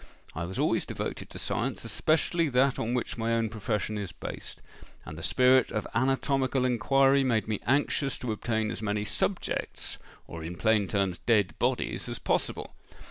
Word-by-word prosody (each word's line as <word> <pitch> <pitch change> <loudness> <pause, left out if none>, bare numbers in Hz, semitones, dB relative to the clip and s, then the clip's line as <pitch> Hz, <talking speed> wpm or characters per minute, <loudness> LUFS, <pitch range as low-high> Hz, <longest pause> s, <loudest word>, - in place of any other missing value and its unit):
I 85 +2 -3
was 95 +2 -5
always - - +1
devoted - - -4
to - - -9
science, - - -2
especially 165 +1 +2
that 135 +1 +3
on 120 +2 -1
which 120 -1 -3
my 115 +1 0
own 115 -1 0
profession 105 -1 -2
is 100 -4 -4
based; - - -7 0.5
and 75 - -7
the 80 - -8
spirit 130 +5 +4
of 105 - -2
anatomical 135 0 +1
inquiry 135 +2 +4
made 115 -5 +1
me 110 -2 -1
anxious 140 +1 +1
to 125 - -3
obtain 110 0 -1
as 110 - -5
many 105 -1 -1
subjects—or 85 -4 -3
in 85 +2 -5
plain 105 +1 +2
terms, 95 -2 0
dead 105 -8 +2
bodies—as - - -1
possible. - - -2
115 Hz, 160 wpm, -28 LUFS, 105-130 Hz, 0.5 s, spirit